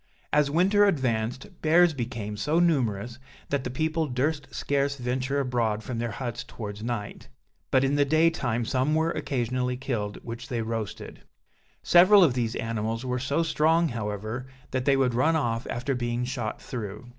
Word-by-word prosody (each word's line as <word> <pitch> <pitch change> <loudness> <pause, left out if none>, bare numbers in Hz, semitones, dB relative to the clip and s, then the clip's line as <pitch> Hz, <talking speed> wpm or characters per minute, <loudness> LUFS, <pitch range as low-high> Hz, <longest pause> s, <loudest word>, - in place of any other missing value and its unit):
As 150 -1 +4
winter 195 +7 +4
advanced, 130 - -1
bears 165 +2 +5
became 115 -5 -4
so 150 +9 0
numerous, 120 - +1 0.3
that 140 -2 0
the 125 - -3
people 155 +4 -1
durst 145 +3 -1
scarce 140 0 0
venture 130 +2 -1
abroad 115 -5 0
from 120 -1 -4
their 120 0 -1
huts 120 +2 -4
towards 105 -2 -7
night; 115 -3 -5 0.4
but 130 - +3
in 135 +1 +1
the 145 - +5
day 160 +4 +4
time 120 -7 -1
some 130 +5 +1
were 160 +1 +2
occasionally 125 -2 -1
killed, 110 -6 -3
which 115 +1 -7
they 115 -2 -1
roasted. 115 -2 -5 0.6
Several 185 +3 +7
of 150 -8 +4
these 120 -3 -1
animals 115 +1 -2
were 125 0 -1
so 140 +6 0
strong, 160 +1 +2
however, 110 +2 -4 0.2
that 130 -1 -1
they 140 -1 +4
would 130 -2 +2
run 150 +7 +3
off 120 -6 -1
after 125 +3 -2
being 120 -1 -2
shot 120 -4 -4
through. 110 -1 -6
125 Hz, 170 wpm, -27 LUFS, 115-145 Hz, 0.6 s, Several